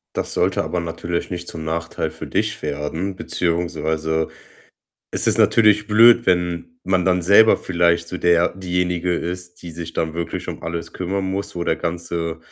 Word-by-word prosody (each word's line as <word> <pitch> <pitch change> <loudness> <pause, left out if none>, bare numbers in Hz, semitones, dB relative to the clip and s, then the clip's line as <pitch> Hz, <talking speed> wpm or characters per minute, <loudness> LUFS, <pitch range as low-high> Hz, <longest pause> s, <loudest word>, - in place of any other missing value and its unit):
Das - - -2
sollte - - +1
aber 90 - -2
natürlich 85 +1 -4
nicht 85 -1 -5
zum 80 -1 -6
Nachteil 80 +1 -3
für - - -8
dich - - -1
werden 75 +6 -3
beziehungsweise 80 -3 -1 0.8
es - - 0
ist - - +2
natürlich 105 -2 +4
blöd, 115 +2 +7
wenn 90 +6 0
man 95 -1 +1
dann 90 -1 +2
selber 100 +5 +6
vielleicht 85 -1 +1
so 90 - -4
der 85 0 +3
diejenige 90 -1 -1
ist, 90 +1 -5
die 85 - -7
sich 85 0 -7
dann 80 -1 -2
wirklich 85 -1 -4
um - - -6
alles 85 0 -5
kümmern 95 +2 -2
muss, 95 +1 -3
wo 85 - -2
der - - +2
ganze, 85 -1 -3
85 Hz, 170 wpm, -21 LUFS, 85-90 Hz, 0.8 s, blöd